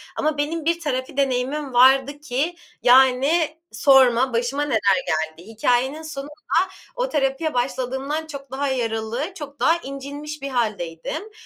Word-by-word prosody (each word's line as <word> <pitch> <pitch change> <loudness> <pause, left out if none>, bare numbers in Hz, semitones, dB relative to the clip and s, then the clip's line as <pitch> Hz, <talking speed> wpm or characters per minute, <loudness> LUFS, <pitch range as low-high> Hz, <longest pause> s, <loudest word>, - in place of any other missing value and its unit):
Ama 305 -1 0
benim 305 +2 -2
bir 335 +1 +1
terapi 265 -4 -3
deneyimim 270 +1 -1
vardı 265 +3 +5
ki 300 +4 -2 0.3
yani 265 +6 +4
sorma 260 0 +4
başıma 245 +5 0
neler 275 -7 +1 0.3
geldi. 160 +4 -2
Hikâyenin 245 +6 0
sonunda 295 -2 -7 0.6
o - - -1
terapiye 290 +2 0
başladığımdan 265 +5 -2
çok 280 -4 -9
daha 280 +2 -1
yaralı, 240 - -2
çok 290 -5 -9
daha 330 +1 +4
incinmiş 285 0 -7
bir 275 - -4
hâldeydim. 210 - -3
270 Hz, 130 wpm, -22 LUFS, 250-300 Hz, 0.6 s, vardı